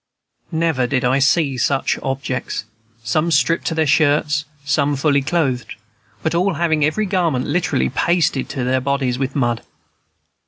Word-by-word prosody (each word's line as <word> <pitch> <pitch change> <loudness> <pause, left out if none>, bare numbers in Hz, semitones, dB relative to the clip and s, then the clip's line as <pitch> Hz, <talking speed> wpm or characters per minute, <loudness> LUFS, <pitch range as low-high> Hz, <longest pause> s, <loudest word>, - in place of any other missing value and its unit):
Never 160 -6 +1
did 130 -1 0
I 130 +2 +2
see 140 -1 +2
such 135 +1 0
objects, 135 -5 -3 0.4
some 155 +9 0
stripped 165 +1 +2
to 165 - -1
their 160 -1 +2
shirts, 150 0 +2 0.2
some 140 +1 +1
fully 140 0 +2
clothed, 135 -4 -1 0.5
but 160 - 0
all 180 +2 +1
having 160 -2 +1
every 155 +9 +1
garment 175 -9 0
literally 145 - 0
pasted 160 - +1
to 130 - -3
them 130 +1 0
bodies 135 -2 -1
with 135 0 -2
mud. 120 -4 0
145 Hz, 150 wpm, -19 LUFS, 130-160 Hz, 0.5 s, I